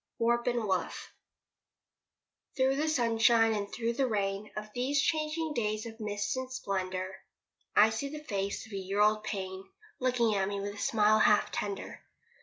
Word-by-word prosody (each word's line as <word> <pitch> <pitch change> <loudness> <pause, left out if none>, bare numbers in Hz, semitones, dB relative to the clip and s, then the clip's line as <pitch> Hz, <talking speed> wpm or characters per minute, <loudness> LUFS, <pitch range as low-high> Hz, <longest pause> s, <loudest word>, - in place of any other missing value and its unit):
WARP 235 +1 +1
AND 240 -2 +1
WOOF 190 -3 -2 1.4
Through 265 +1 +3
the 310 +2 0
sunshine, 230 -4 +4
and 200 -1 -3
through 235 0 -1
the 265 +2 +1
rain 200 -2 -1
Of 215 0 -6
these 265 +4 0
changing 315 0 0
days 215 -3 -1
of 225 0 -9
mist 205 0 -2
and 260 0 -4
splendour, 190 -4 -3 0.6
I 215 +1 +7
see 250 +6 -3
the 300 +1 -7
face 200 -7 -3
of 220 - -15
a - - -2
year 195 +1 -3
old 215 +1 +4
pain 190 -2 -4 0.4
Looking 245 -3 +2
at 195 -1 +1
me 200 0 -3
with 200 +1 -4
a - - -12
smile 215 0 +3
half 210 -1 +4
tender. 200 -1 -4
215 Hz, 170 wpm, -31 LUFS, 200-245 Hz, 1.4 s, I